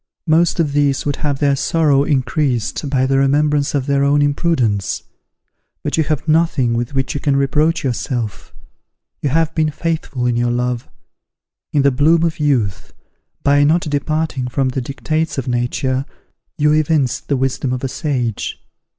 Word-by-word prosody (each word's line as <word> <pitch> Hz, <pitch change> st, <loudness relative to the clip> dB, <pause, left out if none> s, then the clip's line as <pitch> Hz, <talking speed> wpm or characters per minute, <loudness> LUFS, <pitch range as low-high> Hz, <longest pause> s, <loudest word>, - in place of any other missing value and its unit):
Most 170 Hz, +1 st, +2 dB
of 150 Hz, -4 st, +1 dB
these 140 Hz, -2 st, +1 dB
would 145 Hz, -1 st, -1 dB
have 145 Hz, -2 st, -1 dB
their 140 Hz, 0 st, +2 dB
sorrow 145 Hz, -1 st, +2 dB
increased 135 Hz, -2 st, -1 dB
by 130 Hz, -2 st, +2 dB
the 135 Hz, 0 st, +2 dB
remembrance 145 Hz, +1 st, +2 dB
of 135 Hz, -2 st, 0 dB
their 140 Hz, 0 st, +1 dB
own 145 Hz, +1 st, +3 dB
imprudence. 130 Hz, -, 0 dB, 0.8 s
But -, -, -1 dB
you 160 Hz, -, +2 dB
have 155 Hz, +1 st, -2 dB
nothing 155 Hz, -6 st, +2 dB
with 120 Hz, +3 st, -3 dB
which 135 Hz, -1 st, 0 dB
you 145 Hz, -, -3 dB
can 140 Hz, -1 st, +1 dB
reproach 150 Hz, +4 st, +1 dB
yourself. 120 Hz, -4 st, -3 dB, 0.7 s
You 145 Hz, -, 0 dB
have 165 Hz, +3 st, +1 dB
been 155 Hz, -1 st, +1 dB
faithful 150 Hz, -5 st, -3 dB
in 120 Hz, -1 st, +1 dB
your 120 Hz, 0 st, +1 dB
love. 125 Hz, 0 st, -2 dB, 0.8 s
In 145 Hz, -, +2 dB
the 140 Hz, -, +4 dB
bloom 160 Hz, +6 st, +3 dB
of 165 Hz, -1 st, -1 dB
youth, 125 Hz, -10 st, 0 dB, 0.5 s
by 145 Hz, 0 st, +4 dB
not 160 Hz, +4 st, +3 dB
departing 150 Hz, -3 st, -2 dB
from 130 Hz, +1 st, 0 dB
the 130 Hz, +1 st, -2 dB
dictates 155 Hz, +5 st, -2 dB
of 135 Hz, -, -3 dB
nature, 130 Hz, +2 st, -1 dB, 0.5 s
you 150 Hz, 0 st, +3 dB
evinced 155 Hz, -4 st, +1 dB
the 140 Hz, -, +1 dB
wisdom 135 Hz, 0 st, -1 dB
of 125 Hz, 0 st, -3 dB
a -, -, 0 dB
sage. 125 Hz, -6 st, -3 dB
140 Hz, 165 wpm, -18 LUFS, 130-150 Hz, 0.8 s, the